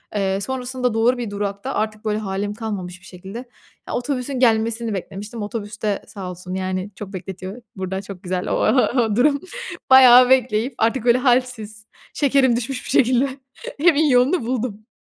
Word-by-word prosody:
Eee, 195 Hz, -1 st, 0 dB
sonrasında 250 Hz, +1 st, -2 dB
doğru 230 Hz, +3 st, +2 dB
bir 240 Hz, -3 st, -4 dB
durakta 200 Hz, +5 st, -4 dB
artık 215 Hz, 0 st, -3 dB
böyle 210 Hz, -1 st, 0 dB
hâlim 205 Hz, 0 st, -3 dB
kalmamış 195 Hz, -5 st, -6 dB
bir -, -, -17 dB
şekilde, 190 Hz, +4 st, -10 dB, 0.5 s
ya, -, -, -5 dB
otobüsün 255 Hz, +1 st, -2 dB
gelmesini 230 Hz, -1 st, +2 dB
beklemiştim. 205 Hz, +4 st, -6 dB
Otobüs 210 Hz, +1 st, -6 dB
de 210 Hz, -2 st, -1 dB
sağ 190 Hz, -3 st, -7 dB
olsun 180 Hz, +1 st, -8 dB
yani 185 Hz, +1 st, -3 dB
çok 205 Hz, -1 st, -9 dB
bekletiyor. 190 Hz, +4 st, -7 dB
Buradan 190 Hz, 0 st, -4 dB
çok 195 Hz, -1 st, -10 dB
güzel 180 Hz, 0 st, -3 dB
o -, -, 0 dB
ha 255 Hz, -, +3 dB
o 225 Hz, -4 st, +2 dB
durum 280 Hz, +4 st, +3 dB, 0.5 s
bayağı 255 Hz, -1 st, +8 dB
bekleyip 255 Hz, -1 st, +2 dB
artık 230 Hz, +2 st, 0 dB
böyle 240 Hz, 0 st, +5 dB
hâlsiz 245 Hz, -5 st, 0 dB, 0.3 s
şekerim 270 Hz, -4 st, +3 dB
düşmüş 250 Hz, +2 st, -3 dB
bir -, -, -7 dB
şekilde. 255 Hz, +2 st, +3 dB, 0.5 s
Evin 315 Hz, -2 st, +4 dB
yolunu 255 Hz, +3 st, +3 dB
buldum. 230 Hz, -3 st, -3 dB
225 Hz, 165 wpm, -21 LUFS, 200-250 Hz, 0.5 s, bayağı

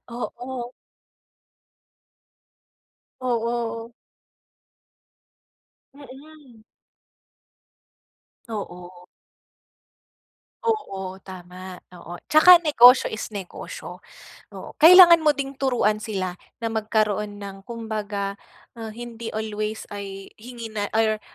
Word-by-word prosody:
Oo. 245 Hz, +1 st, -6 dB, 2.5 s
Oo. 235 Hz, -1 st, -3 dB, 2.0 s
Mm. 275 Hz, -3 st, -15 dB, 1.8 s
Oo. 180 Hz, -4 st, -8 dB, 1.6 s
Oo, 195 Hz, -, -3 dB
tama, 185 Hz, 0 st, -10 dB, 0.2 s
oo. 170 Hz, 0 st, -10 dB, 0.2 s
Tsaka 340 Hz, +3 st, +8 dB
negosyo 255 Hz, -5 st, +6 dB
is 220 Hz, -, -5 dB
negosyo, 195 Hz, -3 st, -8 dB, 0.5 s
oo. -, -, -10 dB
Kailangan 345 Hz, 0 st, +9 dB
mo 305 Hz, -1 st, +4 dB
ding 275 Hz, -1 st, -4 dB
turuan 240 Hz, -6 st, 0 dB
sila 190 Hz, -5 st, -3 dB, 0.2 s
na 230 Hz, -2 st, -3 dB
magkaroon 210 Hz, -1 st, -1 dB
ng 195 Hz, -1 st, -9 dB
kumbaga, 215 Hz, -4 st, -4 dB, 0.4 s
ah, 225 Hz, -1 st, -7 dB
hindi 235 Hz, 0 st, -8 dB
always 215 Hz, 0 st, -4 dB
ay 195 Hz, -1 st, -8 dB
hingi 230 Hz, -1 st, -9 dB
na 205 Hz, -1 st, -3 dB
or, 215 Hz, -1 st, +1 dB
225 Hz, 80 wpm, -23 LUFS, 205-250 Hz, 2.5 s, Kailangan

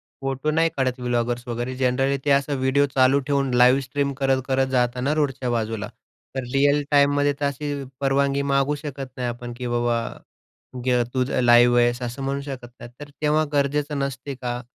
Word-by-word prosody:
Photo 135 Hz, +2 st, -4 dB
नाही 165 Hz, +2 st, +2 dB
काढत 130 Hz, -2 st, -1 dB
bloggers 120 Hz, 0 st, -1 dB
वगैरे 120 Hz, +2 st, -3 dB
जनरली 135 Hz, +2 st, +2 dB
ते 145 Hz, -, +1 dB
असा 140 Hz, +1 st, -3 dB
व्हिडिओ 140 Hz, +2 st, +3 dB
चालू 130 Hz, +1 st, +4 dB
ठेवून 140 Hz, -2 st, +1 dB
लाईव्ह 125 Hz, +2 st, +5 dB
स्ट्रीम 140 Hz, +2 st, -1 dB
करत-करत 135 Hz, 0 st, +1 dB
जातात 125 Hz, 0 st, +1 dB
ना 140 Hz, +3 st, +1 dB
रोडच्या 135 Hz, -4 st, -1 dB
बाजूला. 110 Hz, -2 st, -2 dB, 0.5 s
तर 130 Hz, -, -1 dB
रियल 145 Hz, +1 st, +3 dB
टाईममध्ये 145 Hz, 0 st, +3 dB
तर -, -, 0 dB
अशी 145 Hz, +1 st, -3 dB, 0.3 s
परवानगी 140 Hz, 0 st, +1 dB
मागू 140 Hz, +2 st, +2 dB
शकत 135 Hz, -2 st, -7 dB
नाही 125 Hz, -2 st, -2 dB
आपण 120 Hz, 0 st, -6 dB
की 125 Hz, 0 st, -5 dB
बाबा 120 Hz, 0 st, +1 dB, 0.9 s
गर 125 Hz, -1 st, +3 dB
तूझं 130 Hz, 0 st, 0 dB
लाईव्ह 120 Hz, 0 st, +6 dB
आहेस. 120 Hz, +1 st, +1 dB
असं 125 Hz, +3 st, -5 dB
म्हणू 140 Hz, +1 st, -2 dB
शकत 130 Hz, -2 st, -7 dB
नाही, 120 Hz, -, -9 dB
तर 145 Hz, 0 st, -9 dB
तेव्हा 155 Hz, +1 st, +2 dB
गरजेचं 145 Hz, +1 st, 0 dB
नसते 140 Hz, 0 st, -4 dB
का? 125 Hz, -1 st, -4 dB
135 Hz, 175 wpm, -23 LUFS, 125-140 Hz, 0.9 s, लाईव्ह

